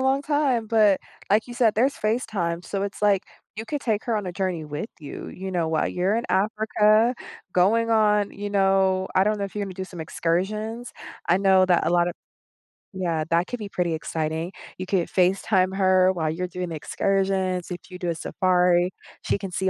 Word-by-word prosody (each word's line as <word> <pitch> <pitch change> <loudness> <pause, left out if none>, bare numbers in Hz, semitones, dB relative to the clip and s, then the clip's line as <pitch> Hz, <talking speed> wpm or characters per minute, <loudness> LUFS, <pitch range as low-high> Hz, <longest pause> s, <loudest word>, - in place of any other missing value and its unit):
long 265 +1 +2
time, 280 -6 +1
but, 215 -3 +4 0.3
like 215 +3 +3
you 240 - -8
said, 235 -3 +3
there's 260 +6 +2
FaceTime, 200 -6 -2
so 195 -1 -3
it's 200 0 -5
like, 200 -2 +3 0.3
you 220 - -5
could 290 +4 -3
take 220 -3 -1
her 230 -3 0
on 205 - -3
a 180 - -4
journey 180 -4 -2
with 150 +9 -5
you, 145 - -8
you 190 +1 -6
know, 170 -3 0
while 160 -1 +1
you're 185 +3 0
in 235 - -2
Africa, 215 +3 +3 0.4
going 225 +6 +3
on, 210 -2 +3
you 205 0 -6
know 195 -1 +2
I 190 +1 +4
don't 210 0 +1
know 200 - -1
if 195 - -8
you're 205 -1 -2
gonna 190 -2 -7
do 190 - -5
some 180 -3 -10
excursions. 210 +9 -2 0.4
I 175 - +5
know 190 -1 +5
that 175 -2 +2
a - - +2
lot 175 0 +3
of 175 - -5 0.8
Yeah, 170 -4 -1
that 170 +2 +2
could 245 - -5
be 205 -2 -6
pretty 175 -3 -1
exciting. 160 +1 -3 0.3
You 185 - -5
could 185 -2 0
FaceTime 185 +1 +2
her 185 -1 +4
while 160 -3 -1
you're 180 +3 -3
doing 180 0 -5
the 165 - -5
excursions. 190 +1 -1
If 175 -1 -8
you 180 - -8
do 175 - -2
a 170 - -1
safari, 180 +1 +2 0.3
she - - 0
can 195 -2 -6
see 190 +1 0
190 Hz, 205 wpm, -24 LUFS, 180-215 Hz, 0.8 s, I